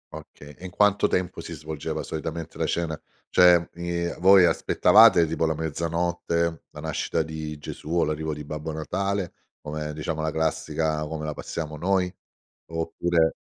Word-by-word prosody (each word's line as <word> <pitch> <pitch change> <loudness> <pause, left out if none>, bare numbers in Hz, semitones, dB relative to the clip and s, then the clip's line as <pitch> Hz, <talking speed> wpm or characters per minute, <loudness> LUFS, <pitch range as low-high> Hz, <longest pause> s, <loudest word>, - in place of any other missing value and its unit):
Okay. 75 0 -12
E 90 - -11
in - - -5
quanto 105 +2 +3
tempo 90 -1 -1
si 85 - -7
svolgeva, 75 -1 -5
solitamente, 80 +1 -5
la - - +1
cena? 80 -2 -2 0.3
Cioè, 90 -2 +6
i 85 0 -2
voi 95 +1 +7
aspettavate 100 0 +6
tipo 80 +1 -1
la 80 - 0
mezzanotte, 85 +1 -1
la - - -11
nascita 80 - -1
di 80 -1 -6
Gesù 75 +1 -9
o 85 +1 +2
l'arrivo 75 +1 -2
di 75 - -7
Babbo 75 +2 -5
Natale, 95 +4 -2 0.3
come, 75 0 -5
diciamo, 80 +1 -3
la 80 - 0
classica 80 0 -1
come 75 0 -5
la 75 - -3
passiamo 75 0 -5
noi? 90 +2 0 0.5
Oppure 80 0 0
80 Hz, 155 wpm, -25 LUFS, 75-85 Hz, 0.5 s, voi